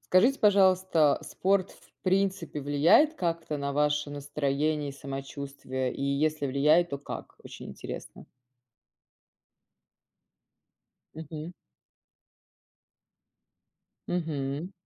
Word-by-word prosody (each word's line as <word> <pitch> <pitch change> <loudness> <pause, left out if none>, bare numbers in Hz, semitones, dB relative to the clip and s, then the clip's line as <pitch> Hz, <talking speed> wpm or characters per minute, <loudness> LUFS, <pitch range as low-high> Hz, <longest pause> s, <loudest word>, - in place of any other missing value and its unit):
Скажите, 240 +9 +3
пожалуйста, 185 -6 +4
спорт, 190 0 0
в - - -22
принципе, 185 -5 0
влияет 145 - +5
как-то 165 - -2
на 140 0 -3
ваше 150 0 +1
настроение 145 +1 -1
и - - -5
самочувствие? 135 -2 -5
И - - -5
если 145 +2 0
влияет, 150 +6 +3
то 140 - -3
как? 140 - -8
Очень - - -9
интересно. - - -8 2.9
Мгм. 160 +1 -7 2.6
Мгм. 155 -1 -3
150 Hz, 85 wpm, -28 LUFS, 140-175 Hz, 2.9 s, влияет